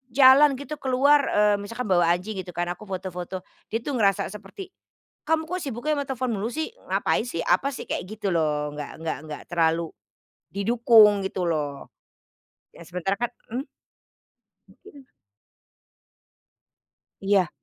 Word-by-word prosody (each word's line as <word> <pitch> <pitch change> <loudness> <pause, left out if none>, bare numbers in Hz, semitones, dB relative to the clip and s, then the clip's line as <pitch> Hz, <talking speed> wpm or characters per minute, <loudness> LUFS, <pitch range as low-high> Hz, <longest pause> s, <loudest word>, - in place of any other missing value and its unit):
jalan 275 +1 +7
gitu 285 +3 -7
keluar," 275 +3 +4
eee, 210 0 +3
misalkan 215 +1 -5
bawa 175 -2 +4
anjing 195 +2 -6
gitu 180 -2 -7
kan, 175 0 -1
aku 195 +4 -8
foto-foto, 185 -1 -5 0.2
dia 225 +2 -3
tuh 290 - -3
ngerasa 195 -2 +2
seperti, 210 - -10 0.5
"Kamu 320 0 0
kok 365 +1 -3
sibuknya 280 +3 -2
ama 285 - -1
telepon 255 -4 -2
mulu 215 +5 -3
sih? 315 +3 -2 0.2
Ngapain - - +1
sih? 205 -9 -5
Apa 270 +12 +2
sih?" - - -7
kayak - - -2
gitu 215 -2 -4
loh 150 -4 0
nggak 150 -1 -6
nggak 165 0 -3
nggak 155 -1 -7
terlalu, 165 -1 +1 0.7
didukung 210 -2 +5
gitu 190 -1 -3
loh. 145 -3 -3 0.8
Ya 170 - -14
sementara 180 +3 -2
kan 240 0 -2 0.2
mhm? 260 +6 -3 1.0
Mungkin. 285 -9 -17 2.2
Iya. 195 -4 +3
210 Hz, 145 wpm, -25 LUFS, 180-260 Hz, 2.2 s, jalan